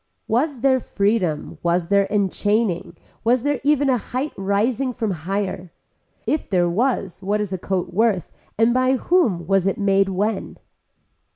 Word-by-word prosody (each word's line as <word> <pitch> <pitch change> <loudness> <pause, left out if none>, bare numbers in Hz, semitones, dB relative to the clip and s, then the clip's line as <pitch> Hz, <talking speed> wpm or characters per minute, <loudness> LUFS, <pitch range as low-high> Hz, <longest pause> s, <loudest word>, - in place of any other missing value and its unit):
Was 260 +2 0
there 265 -1 +4
freedom, 200 -9 -1
was 170 0 0
there 200 -1 +3
enchaining, 205 -1 0 0.3
was 240 +1 +2
there 290 -3 0
even 290 -1 +3
a 255 -3 +2
height 255 +7 -3
rising 215 +7 0
from 220 -3 -2
higher. 185 +1 -3 0.5
If 305 - -1
there 180 -3 +2
was 200 -1 -1
what 205 +2 0
is 205 -2 -2
a 185 - -3
coat 180 -1 -2
worth 210 -3 +1 0.3
and 225 +2 +4
by 255 +1 +3
whom 250 - +1
was 195 +1 +2
it 195 - 0
made 195 -1 +2
when. 200 +2 -2
205 Hz, 155 wpm, -22 LUFS, 190-245 Hz, 0.5 s, there